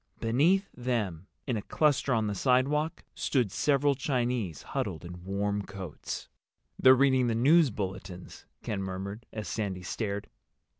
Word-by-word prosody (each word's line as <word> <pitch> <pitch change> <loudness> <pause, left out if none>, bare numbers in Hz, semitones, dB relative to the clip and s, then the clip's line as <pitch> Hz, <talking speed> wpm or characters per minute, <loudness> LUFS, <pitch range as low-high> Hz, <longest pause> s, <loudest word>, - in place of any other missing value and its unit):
Beneath 160 - +3
them, 105 -9 -2 0.2
in 125 -5 -1
a - - -2
cluster 145 +3 +1
on 110 -3 +2
the 105 - -1
sidewalk, 140 - +1
stood 125 -8 0
several 145 +4 +2
Chinese 125 - -1
huddled 80 - -3
in 90 0 -9
warm 100 +2 -1
coats. 95 -5 -7 0.5
"They're 130 0 +8
reading 130 -1 +4
the 115 - +1
news 150 +6 +5
bulletins," 95 -3 -6 0.2
Ken 100 -2 -2
murmured, 95 +4 -5
as 110 -1 -5
Sandy 95 -5 -3
stared. 100 +2 -3
115 Hz, 140 wpm, -29 LUFS, 95-130 Hz, 0.5 s, They're